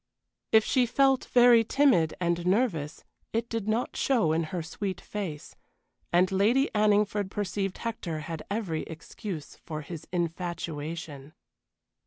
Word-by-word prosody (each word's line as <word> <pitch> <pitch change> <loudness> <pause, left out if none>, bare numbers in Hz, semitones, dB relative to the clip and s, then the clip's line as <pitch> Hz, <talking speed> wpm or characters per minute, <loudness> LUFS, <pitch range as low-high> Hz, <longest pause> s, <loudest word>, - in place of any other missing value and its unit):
If 220 -1 +6
she 250 -2 +2
felt 270 +1 +3
very 240 -2 +6
timid 235 - +3
and 170 -1 0
nervous 185 - 0 0.3
it 230 +1 0
did 225 -3 -3
not 225 +3 -1
show 235 - +2
in 165 +1 +1
her 170 +1 -4
sweet 190 +4 -4
face, 180 -8 -6 0.6
and 180 +2 +3
Lady 225 +8 +3
Anningford 210 -1 +2
perceived 195 -1 -2
Hector 180 -9 -4
had 160 0 -5
every 195 -7 -2
excuse 165 +1 -7
for 155 -2 -6
his 155 +1 -8
infatuation. 165 -4 -4
190 Hz, 130 wpm, -28 LUFS, 165-225 Hz, 0.6 s, If